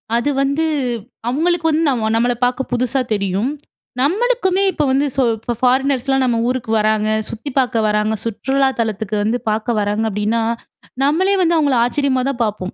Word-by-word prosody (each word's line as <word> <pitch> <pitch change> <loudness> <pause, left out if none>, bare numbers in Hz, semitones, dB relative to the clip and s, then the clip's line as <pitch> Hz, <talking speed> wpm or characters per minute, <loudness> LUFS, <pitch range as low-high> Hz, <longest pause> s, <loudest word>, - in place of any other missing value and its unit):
அது 240 +5 +1
வந்து 280 +4 +1 0.6
அவுங்களுக்கு 325 +6 +1
வந்து 320 +1 +1
நம்ம 225 -5 0
நம்மள 240 +2 +2
பார்க்க 250 +1 -2
புதுசா 255 +2 +1
தெரியும். 200 +4 -1 0.5
நம்மளுக்குமே 390 - +1
இப்ப 300 - -1
வந்து 270 +2 +2
சோ 270 - +2 0.2
இப்ப 235 +2 -4
ஃபாரினர்ஸ்லாம் 265 +1 +2
நம்ம 240 -2 +1
ஊருக்கு 245 -3 -2
வராங்க. 215 0 +1 0.2
சுத்திப் 250 +4 -7
பார்க்க 245 -4 +2
வராங்க. 210 +1 +1
சுற்றுலா 265 +4 0
தலத்துக்கு 220 -2 -2
வந்து 225 +3 0
பார்க்க 220 +2 -1
வராங்க 210 +2 0
அப்பிடின்னா, 210 +3 -1 0.6
நம்மளே 355 +8 +2
வந்து 340 -1 +3
அவுங்கள 285 -4 +2
ஆச்சரியமா 260 +1 +1
தான் 260 -3 -3
பார்ப்போம். 205 -4 -3
250 Hz, 155 wpm, -18 LUFS, 220-280 Hz, 0.6 s, வந்து